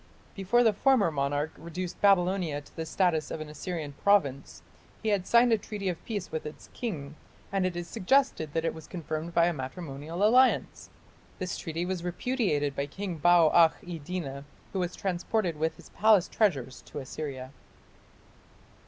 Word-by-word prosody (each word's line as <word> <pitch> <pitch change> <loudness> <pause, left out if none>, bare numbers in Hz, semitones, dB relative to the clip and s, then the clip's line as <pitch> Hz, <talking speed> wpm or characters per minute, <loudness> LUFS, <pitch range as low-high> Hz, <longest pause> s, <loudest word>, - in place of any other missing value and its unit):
Before 205 +5 +2
the 220 -2 +4
former 220 -5 +3
monarch 145 +1 -1
reduced 170 +1 -6
Babylonia 180 -5 +3
to 145 - -20
the 160 -1 -4
status 160 -3 +1
of - - -4
an 155 -1 -6
Assyrian 150 -1 -5
province, 140 -10 +1 0.4
he 220 - +1
had 200 -3 0
signed 235 0 +5
a 220 - +3
treaty 205 -2 -4
of 175 - -5
peace 205 -5 -4
with 160 - -3
its 150 0 -10
king, 155 - -4 0.4
and 195 -2 +1
it 180 - -4
is 175 0 -4
suggested 185 - +1
that 165 0 0
it - - 0
was 160 -1 -11
confirmed 165 -1 -5
by 170 0 +5
a 175 - +1
matrimonial 150 +4 -5
alliance. 250 +5 +3 0.5
This 185 -1 -3
treaty 165 +2 -3
was 180 -1 -3
repudiated 175 - -1
by 140 - -2
King 185 +3 -5
Bau 175 0 +5
akh 165 -2 +5
iddina, 165 -5 -5 0.3
who 190 - -1
was 180 -1 -2
transported 185 -1 -1
with 160 +1 -1
his - - -15
palace 210 -4 +4
treasures 135 - 0
to - - -9
Assyria. 135 -2 -6
175 Hz, 170 wpm, -29 LUFS, 155-195 Hz, 0.5 s, signed